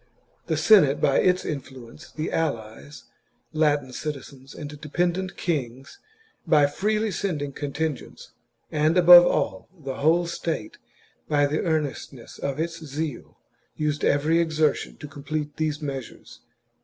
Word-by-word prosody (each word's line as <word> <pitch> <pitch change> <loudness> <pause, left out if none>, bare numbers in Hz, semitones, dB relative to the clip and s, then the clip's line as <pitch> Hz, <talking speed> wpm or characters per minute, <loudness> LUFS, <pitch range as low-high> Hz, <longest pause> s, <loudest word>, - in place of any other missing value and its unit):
The - - 0
Senate 155 -11 +5
by 135 - +3
its 180 0 +2
influence, 130 -2 -8
the 155 - -4
allies, 115 -1 -4 0.5
Latin 145 -4 +1
citizens, 135 -2 -7
and 150 -1 -8
dependent 175 +4 -1
kings, 135 - -4 0.5
by 150 -2 +5
freely 210 +8 0
sending 160 -7 -3
contingents, 145 +1 -5 0.4
and 155 +3 +2
above 175 0 +9
all, 95 -1 -1
the 135 -3 -6
whole 165 +4 +3
state 165 -9 -4 0.5
by 145 -1 +3
the 150 +2 -1
earnestness 150 -6 -3
of 140 +1 -3
its 165 0 -3
zeal, 150 -1 -5 0.4
used 150 -1 -2
every 150 +4 +2
exertion 155 -3 0
to 145 - -9
complete 150 0 -5
these 155 -1 -2
measures. 135 -4 -7
150 Hz, 125 wpm, -25 LUFS, 140-165 Hz, 0.5 s, above